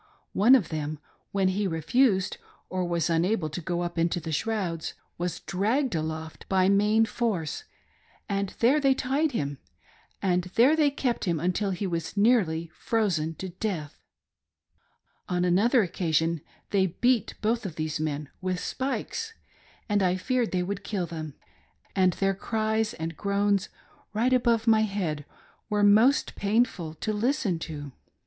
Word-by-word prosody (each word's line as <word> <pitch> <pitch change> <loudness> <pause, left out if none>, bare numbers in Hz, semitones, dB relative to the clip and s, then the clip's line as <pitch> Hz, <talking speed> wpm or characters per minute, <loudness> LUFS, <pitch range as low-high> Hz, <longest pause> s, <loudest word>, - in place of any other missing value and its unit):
One 230 +7 +6
of 205 -11 +1
them 155 -1 -3 0.3
when 195 -1 +2
he 200 +2 0
refused 190 - +2 0.3
or 185 0 -1
was 170 -1 0
unable 170 0 +1
to 175 - -4
go 175 +1 -2
up 175 -1 -3
into 170 +1 +1
the 165 -1 -5
shrouds, 175 -2 -2 0.2
was 175 0 -3
dragged 225 +7 0
aloft 160 0 -4
by 190 -1 +3
main 210 +3 +4
force, 220 - -2 0.6
and 200 -2 -1
there 260 +6 +5
they 275 -2 +3
tied 275 +4 0
him, 140 - -2 0.6
and 180 -2 +1
there 255 +7 +6
they 305 -2 +4
kept 260 -5 -1
him 170 -4 0
until 180 +5 0
he 190 +1 -2
was 170 +1 -3
nearly 180 -8 +2
frozen 170 -8 0
to 190 +4 -6
death, 175 -5 -4 1.3
On 180 0 +1
another 215 +7 +4
occasion 165 -2 0 0.3
they 190 -2 +3
beat 240 +5 +1
both 225 +2 0
of 185 -6 -5
these 155 -1 -2
men 150 -1 -2
with 185 -1 -1
spikes, 440 - -3 0.5
and 205 -1 +2
I 180 -1 +2
feared 245 +5 0
they 180 -1 0
would 200 +2 -4
kill 195 -4 -2
them, 160 -4 -6 0.6
and 185 -2 +4
their 195 0 +1
cries 220 +2 -1
and 165 0 -4
groan? 200 +2 +1 0.5
right 240 +4 +2
above 235 -3 +3
my 220 -2 +5
head 180 -9 -2 0.4
were 210 -1 +1
most 220 +7 +5
painful 200 -6 0
to 215 +7 -2
listen 210 - 0
to. 145 -3 -6
195 Hz, 150 wpm, -27 LUFS, 165-225 Hz, 1.3 s, One